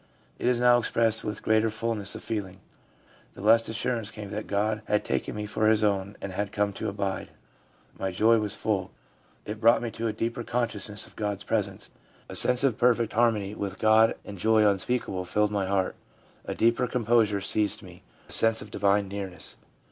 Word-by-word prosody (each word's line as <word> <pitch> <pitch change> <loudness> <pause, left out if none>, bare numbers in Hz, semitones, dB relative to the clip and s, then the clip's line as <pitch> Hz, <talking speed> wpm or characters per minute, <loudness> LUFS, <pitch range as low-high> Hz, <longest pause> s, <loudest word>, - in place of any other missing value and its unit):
It - - -1
is 125 -1 +2
now 120 0 +5
expressed 115 -1 +1
with 105 -1 -5
greater 110 0 +3
fulness 110 -2 -2
of - - -8
feeling. 100 -4 -4 0.8
'The - - -10
blessed 115 +2 +4
assurance 115 -1 -2
came 105 -2 -8
that 105 +1 -5
God 105 +1 0
had 105 0 0
taken - - -2
me 105 0 -4
for 110 +1 0
His 110 0 +3
own 100 -1 0
and 100 - -4
had 100 +2 -3
come 105 -1 0
to - - -3
abide. 100 -1 -3 0.7
My 95 - -1
joy 110 +5 +3
was 105 -2 -1
full/ 95 -4 -1 0.3
' - - -35
It 105 +1 -6
brought 115 0 +5
me 115 - -3
to 115 +1 -3
a - - 0
deeper 115 +2 -3
con 120 +1 0
sciousness 105 +1 -2
of - - -17
God's 105 -2 -3
presence/ 105 -1 -2 0.2
' - - -31
A - - -6
sense 125 +1 +5
of 130 -6 +1
perfect 120 -2 +2
harmony 110 -4 +1
with 100 -2 -5
God 110 0 +4
and 100 -2 -9
joy 110 +1 +4
unspeakable 100 -1 -1
filled 105 +3 0
my 100 -2 -1
heart/ 95 -1 0 0.3
' - - -31
A - - -4
deeper 115 +2 +2
composure 115 -4 +2
seized 105 +1 +1
me, - - -13 0.3
a - - -9
sense 115 0 +5
of 105 - -10
Divine 100 0 +1
nearness.' 95 -2 -5
105 Hz, 200 wpm, -27 LUFS, 100-115 Hz, 0.8 s, now